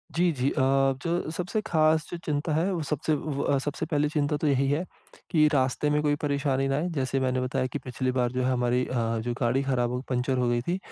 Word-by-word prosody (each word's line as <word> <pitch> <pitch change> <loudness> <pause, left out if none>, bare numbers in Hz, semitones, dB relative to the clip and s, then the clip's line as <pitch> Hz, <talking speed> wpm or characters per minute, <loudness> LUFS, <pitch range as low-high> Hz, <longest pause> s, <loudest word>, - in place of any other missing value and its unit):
जी, 175 +1 +3
जी। 135 -2 0
अ, 145 - 0 0.4
जो 170 -1 -1
सबसे 180 +5 -2
खास 155 -1 +3
जो 175 - -3
चिंता 150 +1 -1
है, 165 +6 +1
वो 170 - -2
सबसे 150 +1 -1
व 140 -1 -1
सबसे 145 +2 -2
पहली 150 -2 +1
चिंता 150 -1 0
तो 150 - -1
यही 140 -1 +2
है, 145 +5 +1 0.5
कि 155 -4 +5
रास्ते 135 +2 +1
में 150 0 +2
कोई 145 -1 +2
परेशानी 140 -2 0
ना 135 - 0
आए। 160 +4 0
जैसे 135 -1 0
मैंने 130 -1 0
बताया 130 0 -1
कि 135 +3 -5
पिछली 130 0 -1
बार 125 -1 0
जो 130 0 -1
है 130 - +1
हमारी 125 0 +1
अ, - - -6 0.3
जो 120 +2 -2
गाड़ी 125 +3 +2
खराब 125 -3 0
हो 125 0 -2
पंचर 125 +1 0
हो 125 -1 +1
गई 120 0 +1
थी। 175 +9 -1
140 Hz, 235 wpm, -27 LUFS, 130-155 Hz, 0.5 s, कि